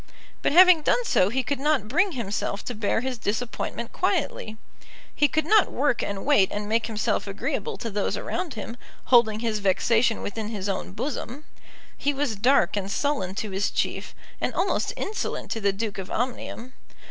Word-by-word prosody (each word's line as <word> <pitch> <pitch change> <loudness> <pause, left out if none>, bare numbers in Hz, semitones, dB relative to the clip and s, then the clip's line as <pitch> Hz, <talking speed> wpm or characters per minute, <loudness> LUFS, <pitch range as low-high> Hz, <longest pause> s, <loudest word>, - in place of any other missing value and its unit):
But - - +1
having 360 0 +8
done 485 +10 +2
so 185 - +3
he 260 +4 0
could 280 +1 -2
not 285 -6 +1
bring 350 - +2
himself 205 -4 -3
to 245 - -3
bear 215 0 0
his 255 -1 -3
disappointment 225 +3 -3
quietly. 215 0 -1 0.6
He 295 - +3
could 315 +1 0
not 425 +4 +4
work 270 -2 +1
and 200 -1 -4
wait 260 -10 +4
and 205 0 -3
make 225 +1 +1
himself 220 -2 -1
agreeable 460 - -3
to 230 - -4
those 205 0 -1
around 350 -8 -3
him, 225 +2 -6 0.3
holding 220 -3 +4
his 225 -3 -1
vexation 225 +4 +2
within 215 +1 -4
his 205 -3 -4
own 190 -1 -3
bosom. 260 +4 -5 0.5
He 290 0 -1
was 275 -5 -1
dark 220 -2 +3
and 195 -1 -2
sullen 200 -5 -1
to 210 0 -3
his 195 +2 0
chief, - - -2 0.3
and - - -1
almost - - 0
insolent 425 - -3
to 225 - -2
the 200 -1 +3
Duke 200 0 -4
of 190 0 -6
Omnium. 245 +1 -4
230 Hz, 180 wpm, -25 LUFS, 205-280 Hz, 0.6 s, having